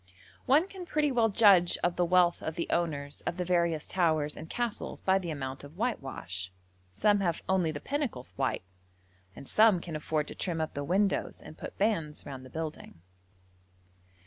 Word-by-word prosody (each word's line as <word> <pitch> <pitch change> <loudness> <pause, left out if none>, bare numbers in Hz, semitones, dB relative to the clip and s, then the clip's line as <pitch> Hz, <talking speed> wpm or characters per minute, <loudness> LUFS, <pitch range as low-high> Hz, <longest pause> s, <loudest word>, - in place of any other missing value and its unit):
One 295 +8 +5
can 375 -3 -9
pretty 300 -2 +1
well 230 -3 +3
judge 200 -5 +5
of 175 0 +2
the 180 - +2
wealth 175 0 +3
of 160 - -4
the 170 - -1
owners 145 -4 -1
of 170 - -1
the 180 - -1
various 170 -3 +1
towers 155 -5 +1
and 160 - -9
castles 240 -3 -3
by 190 0 +3
the 175 -3 -5
amount 135 -3 -5
of 145 +4 -12
whitewash. 130 - -3 0.4
Some 205 - +3
have 170 -4 -1
only 190 -3 +2
the 150 -2 -4
pinnacles 275 - -3
white, 135 -7 -1 0.7
and 140 - -10
some 215 -4 +5
can 170 -2 -7
afford 150 0 -1
to - - -6
trim 170 -3 -2
up 160 - -2
the 145 - -3
windows 190 +6 +1
and - - -11
put - - -8
bands 165 -8 0
round 135 -2 -7
the 130 - -11
building. 155 - -6
170 Hz, 180 wpm, -30 LUFS, 150-200 Hz, 0.7 s, One